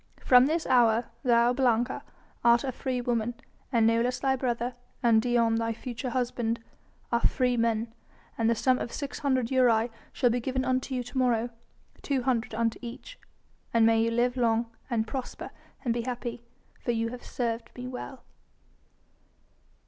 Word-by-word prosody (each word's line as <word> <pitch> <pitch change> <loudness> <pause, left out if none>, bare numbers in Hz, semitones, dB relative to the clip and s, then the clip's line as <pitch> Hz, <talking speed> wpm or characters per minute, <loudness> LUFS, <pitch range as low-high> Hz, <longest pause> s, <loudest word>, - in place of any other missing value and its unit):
From 250 0 +7
this 325 +2 0
hour, 240 -2 +3
thou, 240 -1 +4
Blanca, 245 -2 +1 0.4
art 235 0 +5
a 265 - -1
freewoman, 245 -2 -1 0.4
and 230 -3 +3
Nolus 230 +2 +2
thy 265 -1 +2
brother, 245 -1 -1 0.3
and 230 -2 +5
Dion, 235 -1 +2
thy 230 0 0
future 240 +2 -5
husband, 240 -2 -1 0.5
are 235 - +3
freemen, 230 -3 +1 0.4
and 225 0 +1
the 230 - +3
sum 255 +3 +2
of 235 - -4
six 280 -2 -5
hundred 260 -5 +1
aurei 240 -3 +3 0.2
shall 245 -3 +2
be 245 - +1
given 260 +2 -2
unto 260 +1 0
you 250 - -1
to 245 +2 -8
morrow 240 -2 +1 0.5
two 270 -3 -1
hundred 240 -3 0
unto 230 0 0
each 255 - -9 0.6
and 230 -1 +6
may 225 0 +4
you 230 - +2
live 245 +2 +1
long 230 -1 +1 0.2
and 225 -3 0
prosper 255 +2 -6 0.3
and 235 - +2
be 235 - -1
happy, 240 -1 -4 0.4
for - - -5
you 230 -1 +1
have 245 +1 -8
served 230 -2 -3
me 250 - -7
well." 255 +1 -7
240 Hz, 160 wpm, -28 LUFS, 230-255 Hz, 0.6 s, From